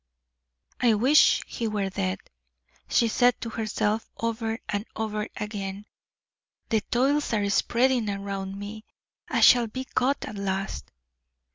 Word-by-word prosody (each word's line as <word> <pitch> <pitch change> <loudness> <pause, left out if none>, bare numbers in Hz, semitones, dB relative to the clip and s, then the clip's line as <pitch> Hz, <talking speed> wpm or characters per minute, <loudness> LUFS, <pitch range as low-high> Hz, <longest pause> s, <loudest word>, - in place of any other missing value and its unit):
"I 235 -3 +4
wish 260 +8 +5
he 230 - -4
were 205 -3 -2
dead," 95 - -1 0.7
she 235 - +3
said 245 +2 +3
to 230 - -4
herself, 215 0 -1
over 225 -1 -2
and 205 0 -2
over 215 -1 -2
again. 205 -1 -5 0.8
"The 220 -1 +2
toils 280 +4 +2
are 205 -1 +1
spreading 240 +1 +2
around 195 -1 -4
me; 205 +2 -7 0.5
I - - +1
shall 240 -2 +7
be 260 +4 -5
caught 265 +2 0
at 210 - -7
last." 195 - -3
215 Hz, 130 wpm, -26 LUFS, 200-235 Hz, 0.8 s, shall